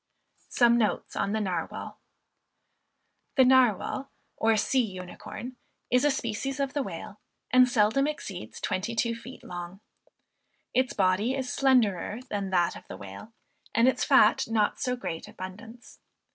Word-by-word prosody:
THE 240 - +7
NARWAL, 215 -4 -1 2.4
OR 225 0 +3
SEA 260 +5 +2 0.2
UNICORN, 210 +7 -8 0.3
Is 250 +1 +4
a 295 - +4
species 265 +1 -2
of 275 -1 -1
the 290 - 0
Whale, 205 -2 -7 0.3
and 255 0 +6
seldom 245 +4 +3
exceeds 195 - -6
twenty 210 +5 -2
two 230 +1 +1
feet 235 +3 -10
long. 175 +1 -7 0.9
Its 255 0 +1
body 200 +6 +2
is 260 -2 -3
slenderer 225 -7 +2
than 200 -2 -2
that 175 -2 +2
of - - -12
the - - -8
whale, 100 - -10 0.4
and 230 +2 +5
its 260 - +2
fat - - +5
not 220 -2 +2
in - - -27
so 250 0 0
great 165 -9 -5
abundance. 210 +6 -10
225 Hz, 130 wpm, -28 LUFS, 190-250 Hz, 2.4 s, THE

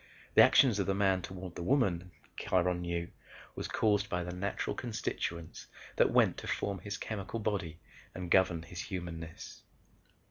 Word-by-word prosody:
The - - +8
actions 120 -7 +6
of 100 - 0
the 95 - +1
Man 95 -2 +2
toward 90 0 -7
the - - -6
Woman, 90 -6 +1 0.3
Kiron 90 -1 +1
knew, 85 0 -2 0.4
was - - -4
caused 105 -1 +1
by 90 0 -1
the 90 +1 -5
natural 100 +3 -2
constituents 85 -8 -4 0.3
that - - +4
went - - +4
to - - -7
form 100 -2 -1
his 100 +2 -5
chemical 110 +1 -4
body 95 -7 -2 0.4
and 90 -2 -5
govern 90 -3 +4
his 85 +1 -9
humanness. 85 -3 -7
90 Hz, 155 wpm, -32 LUFS, 85-100 Hz, 0.4 s, The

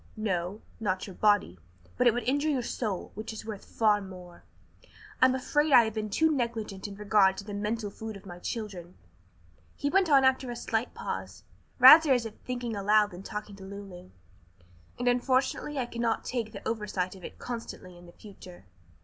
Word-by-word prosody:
"No, 195 -1 -2 0.2
not 190 -4 -1
your 195 - -9
body, 205 - +2 0.4
but 250 - +3
it 235 - +5
would 245 - -2
injure 285 +6 +1
your 265 -5 0
soul, 215 -6 -3
which 215 +2 -6
is 220 -1 -8
worth 215 -3 -7
far 210 -2 +2
more. 180 -2 -11 0.8
I'm 260 0 +5
afraid 295 +3 +1
I 245 -3 +8
have 220 -1 -3
been 215 -1 -3
too 320 +10 +2
negligent 225 -6 -3
in 200 - -9
regard 200 -2 +3
to - - -6
the 205 0 -8
mental 210 +1 -3
food 220 0 -7
of 195 - -17
my 175 -2 -9
children," 185 -5 -6 0.8
he 285 0 -2
went 385 -2 +3
on 275 -2 +6
after 260 -1 +2
a 240 - -4
slight 235 0 -2
pause, - - -6 0.3
rather 290 +4 +9
as 245 -2 +1
if 225 - -6
thinking 245 -3 -4
aloud 210 +1 +3
than 180 +1 -9
talking 210 +1 -7
to 195 - -11
Lulu, 190 -2 -10 0.9
"and 245 - -2
unfortunately 260 +3 +1
I 255 - 0
cannot 235 -1 -2
take 235 -3 -3
the - - -8
oversight 210 -5 -2
of 185 - -14
it - - -9
constantly 230 -6 -7
in 175 0 -15
the - - -13
future. 185 - -14
215 Hz, 190 wpm, -29 LUFS, 195-245 Hz, 0.9 s, rather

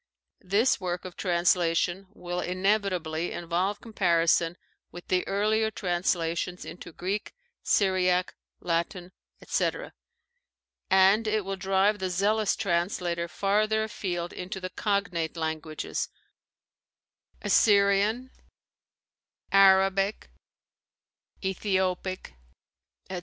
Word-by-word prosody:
This 205 +7 +2
work 180 -1 -3
of 185 - -8
translation 175 +1 +1
will 180 -3 -5
inevitably 185 -4 0
involve 180 +4 -2
comparison 170 -5 +1 0.3
with 175 - -11
the 180 -1 +2
earlier 215 +2 +1
translations 175 -2 -1
into 175 - -9
Greek, 195 - -4 0.3
Syriac, 185 -2 +2 0.3
Latin, 175 +1 -2 0.3
etc., - - -1 1.0
and 195 +4 +5
it 215 -2 0
will 195 0 -3
drive 195 +2 +1
the 185 0 -2
zealous 205 +3 +1
translator 170 -1 -1
farther 215 +5 +1
afield 175 -5 -4
into 185 +1 -6
the 185 -1 -6
cognate 180 -5 -1
languages, 160 -1 -3 1.3
Assyrian, 205 +4 +3 1.2
Arabic, 195 +1 +4 1.1
Ethiopic, 185 - -1 0.7
etc. 185 -1 -4
185 Hz, 90 wpm, -27 LUFS, 175-200 Hz, 1.3 s, and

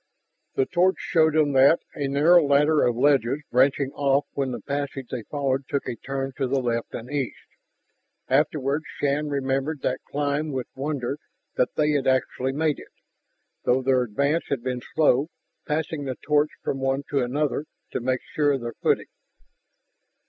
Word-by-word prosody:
The 135 - +2
torch 185 +4 +2
showed 160 -2 +2
them 150 -2 +3
that, 135 +4 +5
a 140 -2 -2
narrow 155 +5 +5
ladder 145 +2 +4
of 120 - +1
ledges 140 +1 +2
branching 135 +2 +3
off 140 0 +1
when 135 -2 -1
the 125 - -4
passage 140 -2 -4
they 125 - -3
followed 135 +2 -2
took 140 -1 -2
a 120 - -3
turn 135 +3 -4
to 135 - 0
the 135 +1 +1
left 120 -2 -2
and 115 - -6
east. 140 -4 -3 0.8
Afterward 140 +1 +1 0.2
Shann 145 +1 0
remembered 135 +1 -1
that 130 - -1
climb 145 +1 -1
with 130 -2 -2
wonder 140 0 -3 0.4
that 125 - 0
they 150 0 +2
had 145 -2 0
actually 130 0 +1
made 150 +1 0
it, - - -12 0.8
though 130 +1 +2
their 130 -1 +3
advance 140 +8 0
had 135 -4 -2
been 125 -1 -2
slow, 150 -2 +4 0.4
passing 150 -1 -2
the 130 -2 -4
torch 150 0 +3
from 135 - -2
one 135 +1 0
to 140 -2 +2
another 145 +4 -1 0.3
to - - -2
make 130 +1 -1
sure 145 -1 +1
of 135 - -2
their 120 0 -5
footing. - - +1
140 Hz, 170 wpm, -25 LUFS, 130-150 Hz, 0.8 s, that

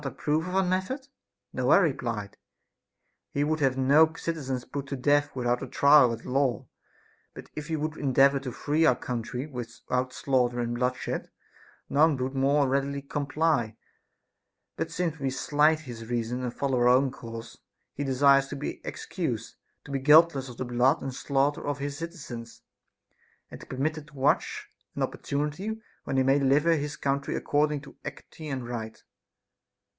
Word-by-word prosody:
ap 135 - -5
prove 155 +3 0
of 180 - -4
our 190 - +4
method 190 +10 -2 0.2
% - - -57
No, 130 -1 0
I - - +8
replied, 120 - -1 0.9
he 140 - 0
would 155 +1 0
have 135 -2 +2
no 145 +5 +5
citizens 135 -7 -3
put 140 -1 -5
to 140 - -3
death 145 +2 +2
without 120 -1 0
a 135 - -4
trial 140 -1 +6
at 115 0 -6
law; 135 -1 0 0.7
but - - -11
if 150 +1 -6
we 160 - 0
would 155 0 -3
endeavor 140 0 +4
to 135 -2 -5
free 150 +6 0
our 160 - +5
country 125 +2 -4
without 125 -1 -4
slaughter 125 -2 0
and 120 0 -1
bloodshed, 125 +1 -2 0.6
none 150 0 +3
would 130 +1 -2
more 140 +1 +3
readily 140 +1 -1
comply; 145 -5 0 1.0
but - - -3
since 165 -3 -2
we 135 -1 -1
slight 150 +3 +2
his 120 -6 -9
reasons 120 +1 -2
and 120 - -4
follow 135 -3 0
our 120 - +4
own 130 +2 +4
course, 115 -2 -9 0.3
he 145 - -3
desires 140 0 +4
to 145 - -6
be 145 - -5
excused, - - -4 0.3
to 145 - -9
be 135 - -1
guiltless 150 -1 +5
of 120 - -10
the 130 - -3
blood 125 +5 +2
and 135 -1 -4
slaughter 140 +2 0
of 145 -1 -1
his 140 0 -4
citizens, 140 -9 -8 0.9
and - - -9
to - - -12
be - - -6
permitted 155 +3 -2
to 150 - -18
watch 135 +2 +1 0.3
an - - -1
opportunity 150 +10 -3 0.3
when 135 - -1
he 130 - +4
may 135 +2 +4
deliver 145 +5 +4
his 145 -1 -3
country 140 0 -1
according 150 0 +1
to 140 - -14
equity 150 +2 -9
and 130 -4 -4
right. 110 -2 -6
140 Hz, 170 wpm, -27 LUFS, 125-150 Hz, 1.0 s, I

